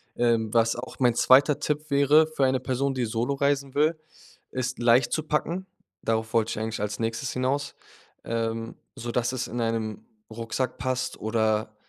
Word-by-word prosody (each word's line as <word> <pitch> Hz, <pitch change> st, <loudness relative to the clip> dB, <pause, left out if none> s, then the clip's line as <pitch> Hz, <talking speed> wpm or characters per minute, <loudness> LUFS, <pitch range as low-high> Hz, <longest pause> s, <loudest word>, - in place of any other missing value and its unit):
Ähm, 115 Hz, -2 st, +1 dB
was 115 Hz, 0 st, +3 dB
auch 120 Hz, -, -8 dB
mein 120 Hz, -2 st, +4 dB
2. 140 Hz, +4 st, +5 dB
Tipp 150 Hz, +1 st, -2 dB
wäre 140 Hz, +3 st, +5 dB
für 135 Hz, -, +3 dB
eine 130 Hz, 0 st, +2 dB
Person, 130 Hz, +2 st, -1 dB
die 125 Hz, -2 st, -1 dB
solo 115 Hz, +5 st, -1 dB
reisen 140 Hz, -1 st, 0 dB
will, 155 Hz, +3 st, +2 dB, 0.5 s
ist 130 Hz, 0 st, -3 dB
leicht 120 Hz, +1 st, +4 dB
zu 155 Hz, -, 0 dB
packen. 165 Hz, +4 st, -1 dB, 0.4 s
Darauf 110 Hz, 0 st, -1 dB
wollte 115 Hz, -1 st, +2 dB
ich 110 Hz, -, -3 dB
eigentlich 110 Hz, -1 st, -3 dB
als 105 Hz, +2 st, -3 dB
Nächstes 115 Hz, +3 st, -2 dB
hinaus, 135 Hz, +3 st, -1 dB, 0.5 s
ähm, 115 Hz, 0 st, -2 dB, 0.2 s
sodass 120 Hz, -1 st, -1 dB
es 130 Hz, -1 st, -3 dB
in 120 Hz, +1 st, -4 dB
einem 115 Hz, -, -2 dB, 0.2 s
Rucksack 115 Hz, +3 st, -3 dB
passt 130 Hz, 0 st, -2 dB
oder 110 Hz, -1 st, 0 dB
125 Hz, 165 wpm, -26 LUFS, 115-140 Hz, 0.5 s, 2